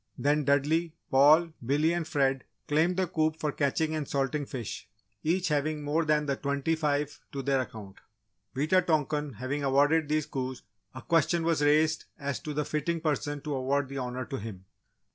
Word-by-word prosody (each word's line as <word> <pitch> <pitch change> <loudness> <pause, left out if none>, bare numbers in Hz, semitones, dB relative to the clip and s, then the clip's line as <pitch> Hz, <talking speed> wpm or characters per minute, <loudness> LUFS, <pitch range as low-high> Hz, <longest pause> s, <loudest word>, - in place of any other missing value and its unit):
Then, 145 +1 +1
Dudley, 155 +4 +1 0.2
Paul, 155 +5 +6
Billy 145 +6 +2
and 170 -2 -2
Fred 135 -3 +1 0.2
claimed 165 +5 +2
the 190 - +2
coup 155 -2 0
for 150 -2 -1
catching 155 +3 0
and 155 -3 -2
salting 140 +1 -1
fish, 120 -5 -6 0.3
each 175 +2 +1
having 150 0 0
more 155 +3 +1
than 150 -1 +2
the 140 -1 0
twenty 140 +3 -1
five 150 -2 -1
to 135 -1 -4
their 135 0 +2
account. 105 -5 -9 0.6
Wita 155 +7 +3
tonkan 150 -4 0
having 130 +6 -3
awarded 145 +3 +3
these 155 -1 +1
coups 130 -1 -4 0.3
a 130 - -8
question 165 0 +2
was 165 -2 +1
raised 155 +2 +3
as 140 -2 -3
to 150 -1 -6
the 150 0 0
fitting 155 +3 -1
person 145 -2 -2
to 150 -1 -4
award 135 +1 0
the 140 0 -4
Honour 125 0 -4
to 135 +4 -5
him. 100 -3 -8
145 Hz, 180 wpm, -29 LUFS, 135-155 Hz, 0.6 s, Paul